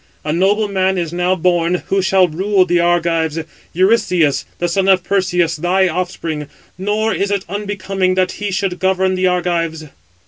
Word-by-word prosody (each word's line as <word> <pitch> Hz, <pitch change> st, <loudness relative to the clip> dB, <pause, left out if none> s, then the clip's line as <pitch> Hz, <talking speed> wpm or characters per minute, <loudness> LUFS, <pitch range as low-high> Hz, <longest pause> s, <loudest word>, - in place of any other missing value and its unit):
A 150 Hz, -, -1 dB
noble 200 Hz, +5 st, +2 dB
man 190 Hz, -1 st, 0 dB
is 170 Hz, -2 st, -3 dB
now 180 Hz, +1 st, +1 dB
born, 175 Hz, 0 st, +1 dB
who 195 Hz, 0 st, +2 dB
shall 190 Hz, -1 st, +3 dB
rule 190 Hz, +4 st, +1 dB
the 175 Hz, -1 st, +1 dB
Argives, 170 Hz, -2 st, +1 dB, 0.3 s
Eurystheus, 180 Hz, -5 st, +2 dB
the 175 Hz, -, -1 dB
son 190 Hz, +3 st, 0 dB
of 190 Hz, -2 st, +4 dB
Perseus, 180 Hz, -4 st, 0 dB
thy 185 Hz, +4 st, +2 dB
offspring; 165 Hz, -4 st, -3 dB, 0.3 s
nor 210 Hz, +4 st, -1 dB
is 200 Hz, -, -1 dB
it 200 Hz, -2 st, -1 dB
unbecoming 195 Hz, -2 st, -2 dB
that 185 Hz, 0 st, +1 dB
he 205 Hz, -, -1 dB
should 185 Hz, -1 st, -2 dB
govern 190 Hz, 0 st, +1 dB
the 185 Hz, 0 st, +1 dB
Argives." 170 Hz, -3 st, -1 dB
185 Hz, 165 wpm, -17 LUFS, 175-195 Hz, 0.3 s, of